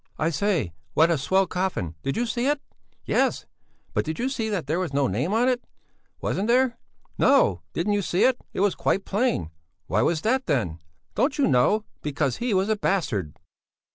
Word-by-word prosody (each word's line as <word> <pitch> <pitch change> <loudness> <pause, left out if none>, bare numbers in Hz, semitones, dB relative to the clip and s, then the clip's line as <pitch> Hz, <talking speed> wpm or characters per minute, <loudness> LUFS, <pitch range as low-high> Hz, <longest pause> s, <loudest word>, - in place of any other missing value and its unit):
"I 160 +2 +1
say, 170 - 0 0.2
what 165 +2 +5
a 165 - +2
swell 190 +7 +2
coffin! 180 - -2
Did 135 - -2
you 240 - +1
see 240 +2 -1
it?" 290 0 +2 0.5
"Yes! - - +1 0.5
But - - +1
did 160 0 -4
you 255 +3 0
see 225 -5 -2
that 195 -8 -2
there 155 +5 0
was 175 -6 -3
no 140 0 +2
name 130 - -1
on 230 +4 +3
it?" 250 -1 +1 0.6
"Wasn't 200 +3 -1
there?" 250 +1 +2 0.4
"No! - - +4
Didn't 205 - 0
you 205 - +1
see 180 -1 +1
it? 255 -1 +3
It - - -3
was 205 -1 +3
quite 195 - 0
plain." 205 - 0 0.3
"Why 95 +6 +1
was 160 +5 +1
that, 260 +6 +1
then?" 105 - 0 0.3
"Don't 275 +2 +1
you 285 - +3
know? 160 +11 +3 0.2
Because 145 -3 -1
he 245 0 -2
was 190 0 +2
a 220 - +2
bastard...." 110 - -1
190 Hz, 195 wpm, -25 LUFS, 145-230 Hz, 0.6 s, what